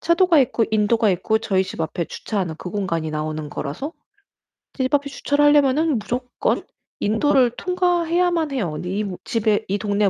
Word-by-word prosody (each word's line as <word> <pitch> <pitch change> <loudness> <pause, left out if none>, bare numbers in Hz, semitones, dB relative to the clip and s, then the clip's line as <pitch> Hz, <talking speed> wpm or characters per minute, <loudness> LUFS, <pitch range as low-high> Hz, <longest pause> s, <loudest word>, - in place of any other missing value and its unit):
차도가 340 -1 +4
있고 235 -3 +2
인도가 215 +1 +3
있고 215 +4 +1
저희 200 -4 +1
집 185 - -7
앞에 165 +1 -2
주차하는 185 -7 -3
그 180 - -6
공간이 165 -5 -2
나오는 155 0 -3
거라서 155 - -5 0.8
집 260 -1 -1
앞에 285 0 +2
주차를 285 +1 +1
하려면은 290 -1 +4
무조건 245 +4 -2 0.4
인도를 250 +4 +3
통과해야만 350 -2 +1
해요. 200 - -2
이 195 +4 -2
모 190 -3 -5
집에 220 -1 0
이 200 - 0
동네 205 -1 +1
225 Hz, 350 characters per minute, -22 LUFS, 190-290 Hz, 0.8 s, 차도가